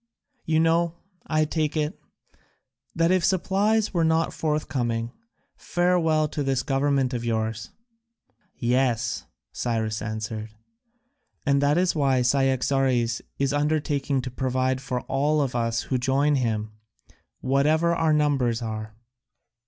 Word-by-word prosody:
You 160 0 +2
know, 165 +1 +2 0.3
I 155 -1 +2
take 155 0 -1
it, 150 0 -2 0.9
that 165 +1 +2
if 185 -2 +2
supplies 200 +4 +1
were 170 -2 +2
not 160 0 +1
forthcoming, 120 -7 -1 0.4
farewell 170 -3 +1
to 150 - -3
this 135 -2 0
government 135 -1 +1
of 120 -1 -3
yours." 110 -1 -2 0.9
"Yes," 120 -2 0 0.3
Cyrus 110 -2 -2
answered, 110 0 -4 1.0
"and 140 -1 +3
that 145 +2 +3
is 180 0 +2
why 135 -4 +2
Cyaxares 130 -2 +1 0.2
is 140 0 0
undertaking 145 -2 0
to 130 - -5
provide 130 0 -1
for 125 -2 -3
all 145 +3 0
of 135 -3 0
us 115 -1 0
who 130 - -1
join 135 +3 +2
him, 110 -5 -1 0.7
whatever 150 +6 +2
our 165 -1 +2
numbers 135 -6 +1
are." 110 -1 -5
135 Hz, 120 wpm, -25 LUFS, 120-155 Hz, 1.0 s, and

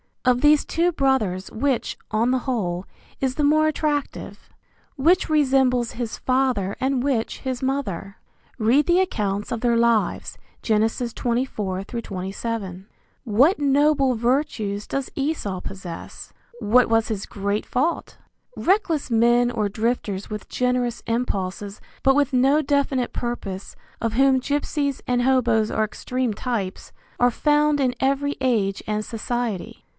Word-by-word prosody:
Of 250 -1 +3
these 300 0 +5
two 345 +2 +1
brothers 245 - 0
which, 260 +2 -1
on 225 +3 +2
the 260 0 +2
whole, 185 -8 -2 0.3
is 260 -1 -1
the 300 - 0
more 310 +2 +4
attractive? 300 -1 -3 0.5
Which 325 +7 +3
resembles 265 -5 +2
his 235 -2 -4
father 255 -7 0
and 260 -1 0
which 260 -5 -1
his 260 -1 -4
mother? 200 -8 -3 0.4
(Read 245 +7 +3
the 350 +1 +3
accounts 210 - -1
of 230 -2 -2
their 240 -1 +2
lives, 230 -1 +1 0.2
Gen. 220 -1 +2
24 235 -5 -2
27.) 195 -2 -5 0.4
What 260 - +4
noble 280 -2 +3
virtues 230 -4 -1
does 275 -1 -3
Esau 275 - -2
possess? 185 -3 -8 0.3
What 245 +4 +4
was 225 -1 +2
his 210 -4 -3
great 200 +1 -2
fault? 305 +7 -1 0.4
Reckless 365 -7 +1
men 240 +1 +4
or 220 -4 -1
drifters 215 -2 -2
with 210 -1 -6
generous 250 -1 0
impulses 205 -4 -3 0.2
but 270 0 +5
with 285 -1 +2
no 270 +4 +4
definite 280 -3 0
purpose, 200 -5 -5 0.2
of 230 -1 -1
whom 265 +2 +4
gypsies 285 0 -1
and 245 -1 +1
hoboes 240 -4 +2
are 220 - +1
extreme 250 +2 -2
types, 205 -4 -4 0.3
are 245 0 +4
found 295 +3 +2
in 255 -2 +1
every 275 +2 0
age 220 -7 0
and 215 0 -1
society. 230 -3 -4
245 Hz, 135 wpm, -23 LUFS, 215-275 Hz, 0.5 s, these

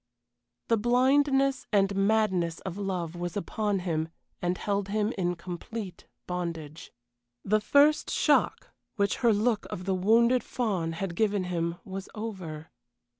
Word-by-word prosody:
The 230 - +4
blindness 270 +3 +3
and 200 -2 +3
madness 195 -5 +1
of 185 -2 -5
love 185 -4 -3
was 175 +1 -4
upon 205 0 -1
him 160 -3 -1 0.3
and 180 +1 0
held 200 -1 -1
him 210 +2 0
in 180 -2 0
complete 180 +3 -7 0.2
bondage. 165 -4 -5 0.5
The 215 +2 +2
first 290 +6 +4
shock, - - +2 0.2
which 200 -2 +1
her 235 -2 +4
look 215 +1 +1
of 180 - -6
the 190 - +1
wounded 230 +6 +4
fawn 190 -9 -1
had 170 +1 -4
given 205 -1 +1
him, 170 -2 -2
was 195 0 -6
over. 185 -8 -6
195 Hz, 135 wpm, -28 LUFS, 175-220 Hz, 0.5 s, The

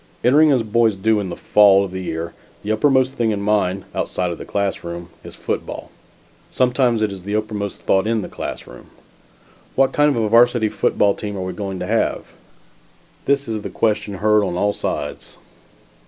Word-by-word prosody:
Entering 150 +5 +5
as 125 -4 +2
boys 110 0 +2
do, 110 +2 +1
in 100 -3 -4
the - - -5
fall 100 -2 +5
of 95 - -8
the 95 0 -5
year, 85 -1 -4 0.3
the 105 - -2
uppermost 130 +3 +2
thing 115 -4 0
in 105 -2 -1
mind, 100 -2 0
outside 90 -1 -2
of 85 - -7
the - - -7
classroom, 85 -4 -3
is - - -11
football. - - -5 0.6
Sometimes 125 -3 +1
it 105 - 0
is 95 -1 -8
the 100 +3 -4
uppermost 105 -2 -3
thought 95 +2 +2
in 115 -2 0
the - - -5
classroom. - - -8 0.9
What 135 0 +3
kind 145 0 +4
of 135 -5 0
a - - +1
Varsity 115 0 +4
football 100 -1 +1
team 105 -1 -6
are - - -4
we 95 - -4
going 100 -2 -5
to - - -2
have? - - -1 0.9
This 140 -1 +1
is 110 -2 -3
the - - -6
question 105 -2 -1
heard 105 +2 +3
on 90 -3 -2
all 105 +2 +1
sides. 75 - -5
105 Hz, 185 wpm, -20 LUFS, 95-115 Hz, 0.9 s, Entering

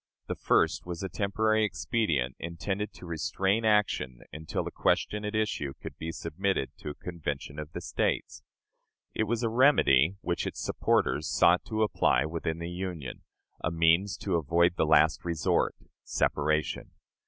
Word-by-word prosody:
The - - -3
first - - +1
was 85 +1 -5
a 95 - -3
temporary 110 +2 +1
expedient, 80 - 0
intended 95 +5 -3
to - - -12
restrain 95 +6 0
action 105 - +1
until 80 0 -3
the - - -5
question 105 0 0
at 105 +1 -3
issue 100 -11 -1
could - - -8
be 80 +1 -4
submitted 85 -2 -2
to - - -7
a 75 - -6
convention 75 -4 -5
of 75 0 -7
the 90 - -5
States. 80 - -2 0.7
It 110 - 0
was 115 +2 -1
a 115 - +2
remedy 105 - +4
which 85 - -2
its - - -5
supporters 75 +2 +1
sought 85 +1 +4
to 110 -1 0
apply 85 - +2
within 80 0 -3
the 85 +1 -5
Union; 90 -7 -5 0.4
a - - +1
means 85 +4 +3
to 95 -4 +1
avoid 85 +3 +2
the 80 - +1
last 80 0 +4
resort 85 -3 +1 0.3
separation. 75 +1 0
85 Hz, 155 wpm, -29 LUFS, 80-105 Hz, 0.7 s, remedy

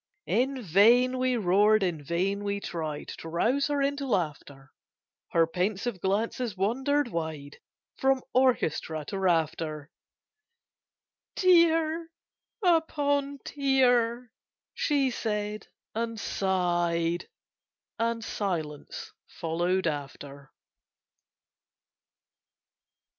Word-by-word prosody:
In 260 +2 +1
vain 235 +8 +4
we 255 -1 +1
roared; 205 +2 +4
in 165 -5 -2
vain 190 +6 -1
we 200 0 -1
tried 155 -6 -5
To 165 - -7
rouse 240 +12 +1
her 290 -1 0
into 280 0 -1
laughter: 145 - -3 0.6
Her 165 -1 +3
pensive 190 +4 -2
glances 215 +2 -1
wandered 265 +7 +1
wide 160 -5 -5 0.4
From 265 -1 +2
orchestra 160 - +1
to 195 - -3
rafter— 160 -4 0 1.4
"Tier 330 -2 +3 0.6
upon 285 -4 +1
tier!" 245 -4 +2 0.4
she 280 -4 +1
said, 210 -2 -3 0.3
and 230 0 -3
sighed; 175 -4 0 0.7
And 230 0 0
silence 165 -10 -4 0.3
followed 175 +3 0
after. 140 -2 -5
205 Hz, 85 wpm, -28 LUFS, 170-255 Hz, 1.4 s, vain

